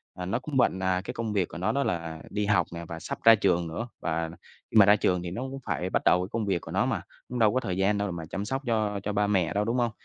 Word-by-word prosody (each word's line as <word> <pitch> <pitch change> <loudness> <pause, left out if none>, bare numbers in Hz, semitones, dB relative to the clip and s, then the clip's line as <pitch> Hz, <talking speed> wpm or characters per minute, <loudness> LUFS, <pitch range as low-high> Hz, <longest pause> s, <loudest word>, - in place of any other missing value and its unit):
à, 90 - -5
nó 105 +7 -1
cũng 135 +1 -4
bận, 110 -7 +3
à, 95 -1 +1
cái 125 - -5
công 115 -3 -3
việc 95 -4 +1
của 75 - -9
nó 95 +5 0
đó 140 +4 +1
là 85 -5 -3
đi 105 0 -1
học 100 -2 +2
nè 85 0 -6
và 85 0 -6
sắp - - -5
ra 115 0 +9
trường 90 -5 +1
nữa. 115 +9 -4
Và 80 0 -2 0.4
khi - - +2
mà 105 - +9
ra 105 +1 +7
trường 90 -3 +1
thì 85 - -5
nó 115 - -4
cũng 135 +1 -5
phải 90 - -2
bắt - - 0
đầu 90 - +5
cái 90 - -6
công 115 -2 -1
việc 95 -4 0
của - - -9
nó - - +2
mà, - - -1 0.3
cũng 125 - -3
đâu 110 -2 +4
có 130 - +2
thời 95 -7 -3
gian 100 +2 +2
đâu 100 0 -1
để 95 - -3
mà 85 -1 -5
chăm 100 - -3
sóc 135 +5 -2
cho 105 -3 0
cho 105 - -2
ba 105 0 +2
mẹ 90 -5 +1
đâu, 105 +1 +1
đúng 115 +3 0
hông? 120 -2 +1
100 Hz, 325 wpm, -27 LUFS, 90-115 Hz, 0.4 s, ra